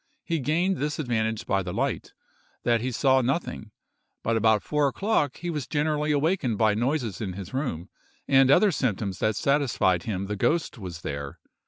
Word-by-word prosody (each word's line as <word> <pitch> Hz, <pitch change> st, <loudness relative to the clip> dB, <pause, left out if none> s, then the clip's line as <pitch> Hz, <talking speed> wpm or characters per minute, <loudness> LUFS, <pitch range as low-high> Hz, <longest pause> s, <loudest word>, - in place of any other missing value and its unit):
He 165 Hz, -1 st, -1 dB
gained 170 Hz, +7 st, +1 dB
this 150 Hz, +1 st, -2 dB
advantage 110 Hz, -6 st, -1 dB
by 95 Hz, -1 st, +1 dB
the -, -, -5 dB
light, -, -, -2 dB, 0.5 s
that 115 Hz, -2 st, +2 dB
he 130 Hz, +2 st, -2 dB
saw 130 Hz, +2 st, +3 dB
nothing; 130 Hz, -4 st, -2 dB, 0.5 s
but 115 Hz, -, +1 dB
about 110 Hz, -2 st, +3 dB
four 150 Hz, -1 st, +1 dB
o'clock, 150 Hz, -, 0 dB
he 175 Hz, 0 st, -4 dB
was 150 Hz, -6 st, -4 dB
generally 150 Hz, 0 st, 0 dB
awakened 145 Hz, -, +1 dB
by 110 Hz, 0 st, +3 dB
noises 120 Hz, -, -1 dB
in 95 Hz, -4 st, -3 dB
his 95 Hz, 0 st, -8 dB
room, 125 Hz, -, -3 dB, 0.4 s
and 135 Hz, -1 st, +5 dB
other 195 Hz, +8 st, +5 dB
symptoms 105 Hz, -, -2 dB
that 110 Hz, -1 st, +1 dB
satisfied 130 Hz, -, +2 dB
him 100 Hz, -2 st, -3 dB
the 105 Hz, +1 st, -3 dB
ghost 145 Hz, -, 0 dB
was 90 Hz, -4 st, -7 dB
there. 70 Hz, -2 st, -5 dB
125 Hz, 175 wpm, -26 LUFS, 105-150 Hz, 0.5 s, and